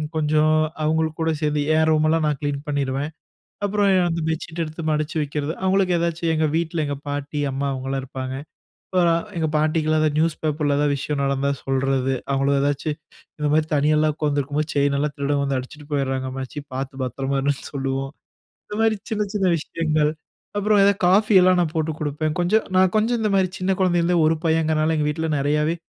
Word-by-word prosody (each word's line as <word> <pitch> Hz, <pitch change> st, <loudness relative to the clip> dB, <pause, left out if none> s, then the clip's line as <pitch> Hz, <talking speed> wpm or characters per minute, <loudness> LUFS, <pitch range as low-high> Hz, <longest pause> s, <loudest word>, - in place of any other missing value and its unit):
கொஞ்சம் 155 Hz, 0 st, +3 dB, 0.3 s
அவுங்களுக்கு 160 Hz, +1 st, 0 dB
கூட 160 Hz, 0 st, +2 dB
சேந்து 150 Hz, -1 st, +1 dB, 0.2 s
என் 160 Hz, 0 st, +3 dB
ரூமெல்லாம் 155 Hz, +1 st, +2 dB
நான் 150 Hz, -3 st, -1 dB
கிளீன் 145 Hz, -1 st, -2 dB
பண்ணிருவேன். 140 Hz, +1 st, -1 dB, 0.5 s
அப்புறம் 205 Hz, 0 st, +2 dB, 0.2 s
அந்த 170 Hz, 0 st, -1 dB
பெட்ஷீட் 160 Hz, +1 st, -3 dB
எடுத்து 160 Hz, +1 st, -7 dB
மடிச்சு 155 Hz, +2 st, -1 dB
வைக்கிறது. 150 Hz, +1 st, -2 dB
அவுங்களுக்கு 190 Hz, -1 st, +2 dB
ஏதாச்சும் 170 Hz, 0 st, -1 dB
எங்க 160 Hz, 0 st, +1 dB
வீட்ல, 165 Hz, 0 st, -1 dB
எங்க 145 Hz, -, -2 dB
பாட்டி, 145 Hz, +1 st, -3 dB
அம்மா 135 Hz, +1 st, -2 dB
அவுங்கலாம் 135 Hz, 0 st, -3 dB
இருப்பாங்க. 130 Hz, 0 st, -5 dB, 0.6 s
இப்ப 185 Hz, -, +1 dB, 0.4 s
எங்க 160 Hz, -, 0 dB
பாட்டிக்குலாம் 155 Hz, 0 st, +1 dB
அந்த 155 Hz, -, +3 dB
நியூஸ் 160 Hz, 0 st, +2 dB
பேப்பர்ல 150 Hz, -2 st, 0 dB
ஏதாவது 145 Hz, -1 st, +2 dB
விஷயம் 145 Hz, +1 st, -3 dB
நடந்தா 140 Hz, 0 st, 0 dB
சொல்றது. 135 Hz, 0 st, 0 dB, 0.2 s
அவுங்கள 140 Hz, +1 st, +2 dB
ஏதாச்சும் 145 Hz, +1 st, -1 dB, 0.4 s
இந்த 150 Hz, -1 st, 0 dB
மாரி 155 Hz, +1 st, +3 dB
தனியாலாம் 150 Hz, +1 st, +2 dB
உக்காந்துருக்கும் 145 Hz, -1 st, -1 dB
போது, 155 Hz, -, -2 dB
செயின் 140 Hz, 0 st, +2 dB
எல்லாம் 145 Hz, 0 st, -1 dB
திருடன் 140 Hz, 0 st, 0 dB
வந்து 140 Hz, -1 st, 0 dB
அடிச்சுட்டு 145 Hz, +3 st, -9 dB
போயிர்றாங்க 135 Hz, -2 st, -1 dB
அம்மாச்சி, 135 Hz, +2 st, -5 dB
பாத்து 135 Hz, +1 st, -4 dB
பத்திரமா 135 Hz, +2 st, -2 dB
இருன்னு 140 Hz, 0 st, -1 dB
சொல்லுவோம் 135 Hz, 0 st, -2 dB, 0.5 s
இந்த 210 Hz, -, -7 dB
மாரி 225 Hz, -1 st, +3 dB, 0.2 s
சின்ன, 210 Hz, -1 st, +1 dB
சின்ன 195 Hz, -3 st, +1 dB
விஷயங்கள்; 155 Hz, -1 st, 0 dB, 0.5 s
அப்புறம் 205 Hz, 0 st, +3 dB
ஏதாவது 200 Hz, 0 st, +4 dB
காஃபி 210 Hz, +4 st, +4 dB
எல்லாம் 185 Hz, 0 st, +4 dB
நான் 165 Hz, -1 st, -1 dB
போட்டு 160 Hz, 0 st, 0 dB
குடுப்பேன். 150 Hz, +1 st, -1 dB
கொஞ்சம் 215 Hz, +5 st, +2 dB
நான் 185 Hz, 0 st, +4 dB
கொஞ்சம் 230 Hz, +2 st, +1 dB
இந்த 215 Hz, -, +1 dB
மாரி 185 Hz, -2 st, +2 dB
சின்ன 185 Hz, +1 st, 0 dB
குழந்தையில 175 Hz, -2 st, +2 dB
இருந்தே 175 Hz, 0 st, +2 dB
1 160 Hz, 0 st, +2 dB
பையன்ங்கிறனால 160 Hz, 0 st, +2 dB
எங்க 150 Hz, -, +1 dB
வீட்ல 160 Hz, +1 st, -2 dB
நிறையாவே 150 Hz, +3 st, +1 dB
155 Hz, 180 wpm, -22 LUFS, 140-165 Hz, 0.6 s, ஏதாவது